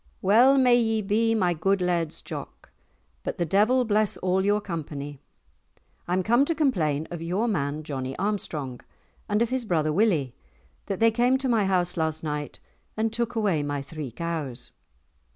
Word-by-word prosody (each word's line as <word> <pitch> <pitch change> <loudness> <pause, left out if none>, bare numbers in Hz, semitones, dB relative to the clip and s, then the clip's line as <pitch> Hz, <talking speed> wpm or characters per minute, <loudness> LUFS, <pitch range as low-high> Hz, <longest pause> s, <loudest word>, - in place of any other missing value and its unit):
"Well 245 +8 +6
may 250 -2 +5
ye 225 -2 +1
be, 225 +3 +2
my 180 -5 +2
good 195 +5 +1
Laird's 175 -3 -1
Jock, - - -8 0.5
but - - -4
the 175 - 0
devil 215 +9 +3
bless 215 -1 +1
all 185 +1 +1
your 205 +1 +2
company. 145 -7 -6 0.9
I'm 185 +2 +1
come 235 +7 +4
to 330 - -1
complain 160 - +1
of 170 -2 -5
your 185 +8 -1
man, 150 -7 -1
Johnie 135 -3 -5
Armstrong, 155 -11 -3 0.5
and 210 +2 +2
of 235 - -2
his 260 -1 -1
brother 155 -7 0
Willie, 165 - +2 0.5
that 195 - -3
they 225 0 +5
came 245 +3 +3
to 265 0 -2
my 225 -5 +2
house 180 -2 +1
last 160 -1 -1
night 150 -1 -4 0.4
and 220 0 0
took 235 +1 -1
away 200 -9 +1
my 145 -1 -3
three 150 -1 -6
cows." 145 -2 -5
185 Hz, 170 wpm, -26 LUFS, 155-225 Hz, 0.9 s, Well